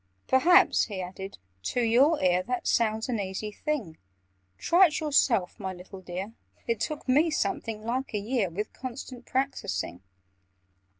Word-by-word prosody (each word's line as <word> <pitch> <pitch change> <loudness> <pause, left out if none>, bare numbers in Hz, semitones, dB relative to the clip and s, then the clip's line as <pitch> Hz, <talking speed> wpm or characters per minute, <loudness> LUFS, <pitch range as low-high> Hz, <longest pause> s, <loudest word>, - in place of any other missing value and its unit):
"Perhaps," 345 +8 +5
he 200 -4 -6
added, 190 +2 -7 0.2
"to 170 - -2
your 260 +7 +4
ear 180 0 +3
That 245 +5 -3
sounds 220 -1 +1
an 240 -4 -1
easy 195 +2 -4
thing? 215 - -4 0.6
Try 365 +2 +5
it 305 - -3
yourself, 265 - +2
my 190 -2 -4
little 185 +1 -11
dear! 185 +4 -6 0.3
It 230 -2 -1
took 295 +6 -4
me 295 +6 +4
something 290 - -2
like 250 0 -2
a - - +2
year, 210 -1 0
With 205 +6 -5
constant 255 -1 -8
practising. 175 - -2
230 Hz, 145 wpm, -28 LUFS, 190-265 Hz, 0.6 s, Perhaps